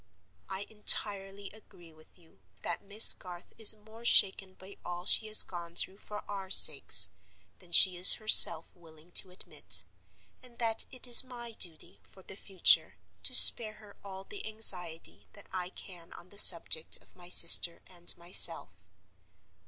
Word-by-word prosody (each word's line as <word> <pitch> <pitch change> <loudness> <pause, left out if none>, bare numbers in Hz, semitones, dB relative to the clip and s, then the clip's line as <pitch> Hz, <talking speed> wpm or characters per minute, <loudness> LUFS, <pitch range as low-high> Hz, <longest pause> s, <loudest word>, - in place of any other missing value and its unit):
I 190 0 -11
entirely 200 -2 -4
agree 185 -6 -23
with 155 +3 -26
you 165 - -28 0.2
that - - -10
Miss 205 +2 +5
Garth 180 -1 -18
is 220 -1 +2
more 220 +2 -23
shaken 195 -4 -3
by 190 +1 -21
all 175 0 -13
she 220 - 0
has 215 0 +2
gone 170 -2 -16
through 190 +3 -11
for 210 0 -16
our 195 -2 -13
sakes - - +4 0.5
than 180 -2 -22
she 180 +1 +1
is 180 +1 +7
herself 215 -7 +4
willing 165 -1 -25
to 185 - -1
admit; 180 - -5 0.6
and 245 -2 -23
that 225 -2 -4
it 255 -1 -9
is 245 0 +2
my 240 -2 -16
duty, 175 -3 -9
for 190 - -26
the 195 - -15
future, 190 -2 -4 0.3
to - - -7
spare 215 -2 +3
her 210 -2 -23
all 190 -1 -16
the 405 - -17
anxiety 180 -7 -3
that 200 - -17
I 180 -1 -9
can 175 -3 -15
on 175 - -20
the 205 - -5
subject 165 -4 +2
of - - -25
my 175 -1 -14
sister 170 -1 +3
and 175 -1 -3
myself. 165 - -1
190 Hz, 160 wpm, -24 LUFS, 175-215 Hz, 0.6 s, is